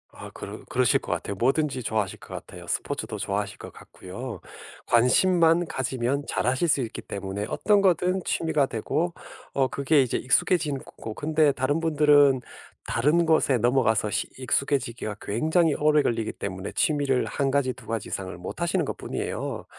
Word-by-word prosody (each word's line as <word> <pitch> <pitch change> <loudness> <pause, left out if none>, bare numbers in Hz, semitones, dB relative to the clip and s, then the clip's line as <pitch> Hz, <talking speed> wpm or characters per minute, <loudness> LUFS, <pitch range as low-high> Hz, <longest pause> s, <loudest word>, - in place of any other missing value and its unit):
아 - - -10
그러 - - -8
그러실 - - +2
것 - - -7
같아요. 100 - -4
뭐든지 130 +3 0
좋아하실 110 -4 -2
것 - - -12
같아요. - - -9
스포츠도 - - -3
좋아하실 100 0 -3
것 - - -10
같고요. 115 +7 -9 0.4
관심만 165 +8 +4
가지면 130 0 -2
잘하실 130 +7 0
수 145 -3 +2
있기 115 - -5
때문에 100 +1 -5
어떤 205 -1 +2
거든 185 0 +2
취미가 155 -3 +1
되고 155 +9 -2 0.4
어 135 -1 +2
그게 140 +3 +3
이제 130 - 0
익숙해지는 145 +1 +1
거고 110 - -8
근데 155 +3 +2
다른 135 +5 0
분들은 145 -4 +4 0.4
다른 155 +8 +2
곳에 150 -5 +3
넘어가서 115 -3 +2
시 - - -1
익숙해지기가 125 -5 -1
굉장히 160 - +1
오래 150 0 +3
걸리기 115 -4 -1
때문에 95 -1 -5
취미를 140 -4 +1
1 140 -2 -1
가지 135 -2 +1
2 125 -1 -15
가지 115 -1 -4
이상을 95 -1 -4
못 90 - -7
하시는 175 +1 +1
것뿐이에요. - - -4
135 Hz, 365 characters per minute, -26 LUFS, 115-155 Hz, 0.4 s, 관심만